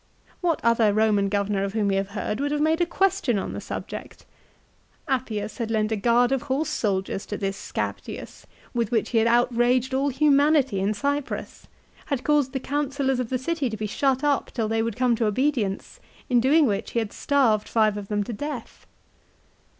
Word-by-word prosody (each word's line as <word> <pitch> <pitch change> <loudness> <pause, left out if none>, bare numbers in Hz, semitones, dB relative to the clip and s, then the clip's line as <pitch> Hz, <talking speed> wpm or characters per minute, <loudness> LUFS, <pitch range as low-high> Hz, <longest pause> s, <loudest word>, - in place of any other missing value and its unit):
What 340 -3 +1
other 230 -2 +4
Eoman 205 -2 +2
governor 200 -1 0
of 200 0 -3
whom 215 -2 +1
we - - +1
have 195 0 0
heard 210 - -2
would 285 +1 -1
have 295 - 0
made 315 +3 +2
a 345 - +2
question 385 - +1
on 195 - -3
the - - -5
subject? - - -7 0.8
Appius 230 -5 -2
had 230 -2 -2
lent 215 -1 0
a - - +2
guard 240 +4 +3
of 270 -2 +1
horse 285 +4 -1
soldiers 195 -5 -1
to 205 - -4
this 195 -1 -2
Scaptius - - -6 0.3
with 235 -4 0
which 225 -3 0
he 230 - +3
had 225 - +3
out 240 +1 +3
raged 245 +2 +2
all 275 +2 +1
humanity 280 -4 +3
in 200 +3 0
Cyprus, 285 +4 -3 0.4
had 275 -4 -2
caused 290 -3 +2
the 265 - -1
councillors 275 -1 -1
of 245 -3 -2
the 255 - 0
city 280 0 -1
to 220 - -5
be 215 - -3
shut 265 +5 0
up 290 -2 +1
till 225 -4 -2
they 225 +1 0
would 230 -2 -2
come 250 -2 +2
to 225 -2 +1
obedience, 220 -3 -1 0.3
in 245 - +5
doing 290 +6 +4
which 200 -5 -2
he - - -2
had 220 -3 -1
starved 240 -7 +2
five 215 -2 +2
of 205 -1 -6
them 205 0 0
to 230 - -6
death 275 +1 -7
240 Hz, 200 wpm, -25 LUFS, 215-280 Hz, 0.8 s, in